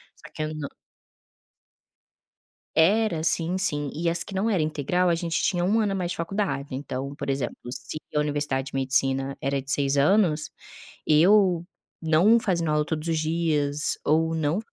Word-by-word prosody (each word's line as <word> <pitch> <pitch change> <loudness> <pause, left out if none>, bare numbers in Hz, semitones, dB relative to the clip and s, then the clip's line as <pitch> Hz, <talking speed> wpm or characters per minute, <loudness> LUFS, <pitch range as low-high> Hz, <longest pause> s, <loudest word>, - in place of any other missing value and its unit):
Só - - -15
que 155 - -3
eu 155 0 -4
nã 145 -2 -5 2.1
Era, 200 +1 +3
assim 165 +3 0
sim. 145 -7 0
E 170 +2 -1
as 170 0 0
que 195 - -10
não 210 +4 +1
era 190 -7 +1
integral 155 +4 0
a 170 - +3
gente 170 -1 -2
tinha 175 -3 0
1 215 +4 +2
ano 210 -2 +1
a - - -2
mais 180 -2 -2
de - - -5
faculdade, 165 -7 -2
então, 140 0 -5
por 140 -1 -5
exemplo, 135 -3 -2 0.2
se 135 - -6 0.2
a - - +3
universidade 145 -2 -1
de 135 - -8
medicina 135 0 0
era 140 0 -1
de 135 +2 -4
6 140 0 +1
anos, 155 -1 +3 0.6
eu 175 +2 +4 0.4
não 170 +9 +4
fazendo 170 -6 -1
aula 150 0 +1
todos 155 +1 -3
os 160 -1 0
dias 155 -2 0
ou 160 +2 +2
não 160 +4 0
155 Hz, 175 wpm, -25 LUFS, 145-175 Hz, 2.1 s, eu